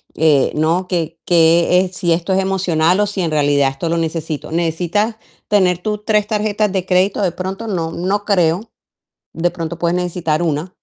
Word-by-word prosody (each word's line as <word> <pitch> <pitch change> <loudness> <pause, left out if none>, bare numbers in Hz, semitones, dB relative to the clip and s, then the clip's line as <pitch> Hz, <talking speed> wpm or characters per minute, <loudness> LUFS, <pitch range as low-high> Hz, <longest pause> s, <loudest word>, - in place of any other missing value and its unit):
eh, 150 -4 +3
¿no? 165 +4 +1
Que 165 -2 -2
qué 170 +1 +4
es, 185 -1 -4
si 170 -2 -1
esto 175 +3 -1
es 190 - +2
emocional 185 -2 +1
o 210 - +2
si 200 -2 -3
en 165 -2 -1
realidad 145 -2 +2
esto 150 +5 -4
lo 170 - 0
necesito. 160 -2 -3
¿Necesitas 175 +6 0 0.3
tener 185 -4 +2
tú 210 +3 -2
3 210 -1 +1
tarjetas 210 -1 0
de 190 -2 -2
crédito? 185 +2 +1
De 180 - +1
pronto, 190 +5 -5
no 165 -5 -2
no 195 +5 -1
creo, 185 +2 +1 0.6
de 170 +1 0
pronto 170 -1 -5
puedes 170 0 0
necesitar 175 -2 -1
1. 160 +2 -1
175 Hz, 185 wpm, -18 LUFS, 165-195 Hz, 0.6 s, qué